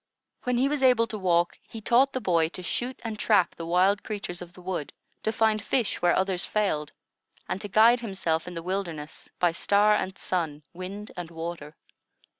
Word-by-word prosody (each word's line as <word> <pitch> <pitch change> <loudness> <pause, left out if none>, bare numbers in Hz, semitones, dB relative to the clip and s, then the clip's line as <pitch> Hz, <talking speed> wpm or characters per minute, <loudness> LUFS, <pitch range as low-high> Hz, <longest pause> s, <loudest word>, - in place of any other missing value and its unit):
When 250 -1 +1
he 260 +3 +3
was 290 -1 -1
able 250 -3 +5
to 220 - -5
walk, 175 -2 +1
he 225 - -10
taught 245 +5 +3
the 260 - -1
boy 165 -7 +2
to 185 - -7
shoot 245 +8 -3
and 220 -2 -5
trap 205 -5 +3
the 165 - -7
wild 190 +4 +3
creatures 200 -5 -5
of 175 0 -9
the 180 - -14
wood, 175 -5 -4 0.3
to 220 - 0
find 220 -1 +2
fish 240 0 0
where 175 0 +4
others 190 -1 +1
failed, 155 -9 0 0.6
and 190 - -3
to - - -4
guide 225 +4 +6
himself 190 -8 -2
in 180 - -7
the 165 - -5
wilderness 170 -5 -4
by 175 -1 +3
star 205 +4 +3
and 190 -2 -1
sun, 160 -5 -2
wind 195 +4 -7
and 175 -2 -6
water. 165 -2 -6
190 Hz, 195 wpm, -27 LUFS, 170-220 Hz, 0.6 s, guide